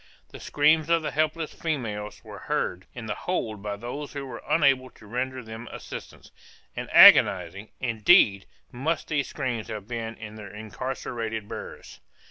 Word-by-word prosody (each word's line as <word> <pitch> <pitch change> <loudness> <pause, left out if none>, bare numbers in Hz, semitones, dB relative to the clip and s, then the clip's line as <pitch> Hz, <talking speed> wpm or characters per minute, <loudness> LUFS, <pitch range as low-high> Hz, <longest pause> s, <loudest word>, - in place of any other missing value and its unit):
The - - -11
screams 155 +2 +2
of 170 -1 +3
the - - -2
helpless 155 +1 -1
females 110 - -4
were - - -10
heard 90 +1 -2
in 120 -2 -7
the 105 - -2
hold 110 - -3
by 105 0 -4
those 125 +7 -6
who 140 -1 -5
were 130 - -8
unable 135 -5 +3
to 110 - -18
render 125 +4 -3
them 110 +2 -9
assistance, - - -9 0.4
and - - -5
agonizing, 95 +3 +7
indeed, 110 - +4 0.2
must 145 +7 -2
those 145 -4 0
screams 125 -6 -3
have 105 -2 -6
been 115 -1 -4
to 110 -1 -9
their 105 -2 -9
incarcerated 110 0 -5
hearers! 105 - -9
120 Hz, 155 wpm, -26 LUFS, 105-140 Hz, 0.4 s, agonizing